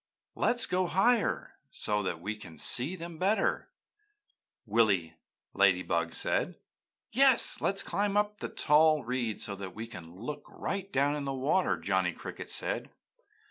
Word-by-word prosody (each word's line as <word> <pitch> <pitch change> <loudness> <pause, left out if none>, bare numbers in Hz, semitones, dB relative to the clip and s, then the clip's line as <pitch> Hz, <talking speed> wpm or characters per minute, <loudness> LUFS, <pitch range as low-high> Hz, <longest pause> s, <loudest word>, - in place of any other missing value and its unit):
"Let's 240 -1 +2
go 185 0 0
up - - -8
higher 225 +4 +1
so 105 0 -1
that 90 -4 -3
we 105 +5 -4
can 90 -6 -11
see 135 +9 +1
them 170 -2 -8
better," 200 +4 +1 1.0
Willy 100 -7 +2 0.4
Ladybug 90 -4 +2
said. - - 0 0.6
"Yes, 265 0 +4
let's 195 - +1
climb 205 0 0
up 210 0 +3
on - - -34
the - - -4
tall 155 0 +4
reeds 120 -2 -2
so 100 - -4
that 95 -2 -7
we 110 +1 -5
can 90 -7 -11
look 120 +10 -6
right 195 0 -4
down 140 +2 +2
in 145 -1 -4
the 135 - -2
water," 145 +8 +1
Johnny - - 0
Cricket - - -8
said. - - -2
135 Hz, 155 wpm, -30 LUFS, -, 1.0 s, Yes